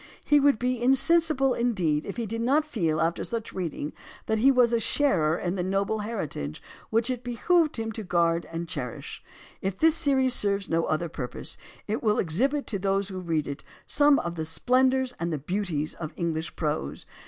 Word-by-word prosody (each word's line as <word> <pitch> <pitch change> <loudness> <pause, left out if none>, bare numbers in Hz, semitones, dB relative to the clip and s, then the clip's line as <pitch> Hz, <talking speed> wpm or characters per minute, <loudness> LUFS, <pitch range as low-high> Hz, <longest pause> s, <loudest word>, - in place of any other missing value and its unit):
He 295 - +5
would 280 -3 +4
be 250 +1 -1
insensible, 270 +1 +4
indeed, 180 -12 0
if 200 - -6
he 235 - -2
did 230 +2 -4
not 280 +6 +2
feel 165 - -1
after 165 +1 0
such 230 -2 -4
reading 165 -5 -4 0.3
that 220 0 0
he 260 +5 +5
was 250 -3 +4
a 235 - +3
sharer 175 - +2
in 175 0 -2
the 190 - -2
noble 195 +3 0
heritage 160 - -4 0.3
which 230 +3 +1
it 250 -1 -4
behooved 305 +7 +1
him 225 0 -3
to 220 - -6
guard 170 -3 +1
and 165 +1 -4
cherish. 125 -6 -6 0.4
If 190 0 -2
this 320 +5 +5
series 270 -5 +2
serves 200 -3 +1
no 165 0 +1
other 155 +2 -1
purpose, 125 -5 -5 0.3
it 215 +2 -2
will 215 -2 +2
exhibit 265 - +1
to 200 - -3
those 195 +1 0
who 190 -1 -5
read 165 -4 -1
it 140 +1 -6 0.2
some 290 -1 +4
of 170 - -2
the 160 -2 -4
splendors 255 +8 +2
and 170 0 -2
the 155 - -1
beauties 160 -1 -2
of 160 -1 -7
English 165 -2 -2
prose. 150 - -3
205 Hz, 190 wpm, -27 LUFS, 165-255 Hz, 0.4 s, He